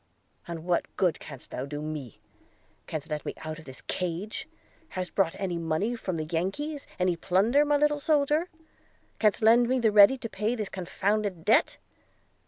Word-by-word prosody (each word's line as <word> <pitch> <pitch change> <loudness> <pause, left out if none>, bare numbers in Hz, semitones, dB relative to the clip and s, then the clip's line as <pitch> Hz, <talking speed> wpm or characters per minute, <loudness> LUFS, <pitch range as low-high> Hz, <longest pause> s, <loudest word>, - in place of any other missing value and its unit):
"And 170 -2 -6
what 175 -1 +1
good 180 -4 +2
canst 135 -4 -11 0.2
do 145 0 -4
me? 150 -6 -6 0.7
Canst 155 0 -5
let 150 -1 -2
me - - -5
out 155 0 -5
of 160 - -13
this 130 -1 -11
cage? 180 +4 -3 0.4
Hast 185 -1 -4
brought 190 -4 +1
any 185 -3 -2
money 165 +9 -1
from 190 -6 -4
the 155 -1 -2
Yankies? 195 - -3
any 180 -1 +2
plunder, 205 - +3
my 295 0 +3
little 295 0 +2
soldier? 300 +3 +2 0.7
Canst 215 0 +2
lend 235 +2 +6
me 260 - +2
the 230 -3 +3
ready 205 +5 +7
to 240 - -5
pay 215 +2 -1
this 215 -4 -4
confounded 195 0 -2
debt?' - - +3
190 Hz, 170 wpm, -28 LUFS, 165-235 Hz, 0.7 s, ready